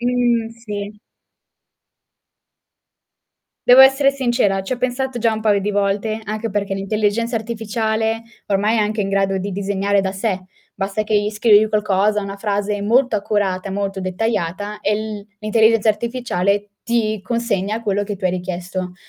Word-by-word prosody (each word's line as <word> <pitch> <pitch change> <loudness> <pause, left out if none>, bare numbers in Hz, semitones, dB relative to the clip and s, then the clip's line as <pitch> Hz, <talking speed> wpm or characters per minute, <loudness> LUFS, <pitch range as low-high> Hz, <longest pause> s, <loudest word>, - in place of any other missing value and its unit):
Mhmm, 240 -2 +1
sì. 205 0 -6 2.7
Devo 250 +1 +8
essere 270 +1 +6
sincera, 240 -7 +1
ci 195 - -4
ho - - -1
pensato 250 0 -2
già 230 -1 +2
un 220 - -3
paio 210 -2 +2
di 205 +2 -1
volte, 205 +2 0
anche 215 +1 -3
perché 200 -1 -1
l'intelligenza 215 +4 0
artificiale 225 0 -2 0.2
ormai 205 +3 +1
è - - +3
anche 210 0 0
in 195 - -2
grado 195 -1 +1
di 195 +1 -4
disegnare 200 +1 0
da 190 -1 -1
sé, 190 -1 -2 0.3
basta 195 +2 -2
che 215 0 +1
gli 205 0 +1
scrivi 215 0 +4
qualcosa, 210 0 +1
una 195 0 -5
frase 205 0 -1
molto 245 +4 +3
accurata, 200 -2 -1
molto 195 0 -3
dettagliata, 205 +1 -2
e 210 +1 +1
l 215 -1 -5
l'intelligenza 220 +1 +3
artificiale 210 -3 -1
ti 220 -3 0
consegna 220 -1 -1
quello 205 -2 0
che 205 0 -4
tu 185 - -9
hai 180 - +2
richiesto. 180 0 -4
210 Hz, 150 wpm, -20 LUFS, 195-225 Hz, 2.7 s, Devo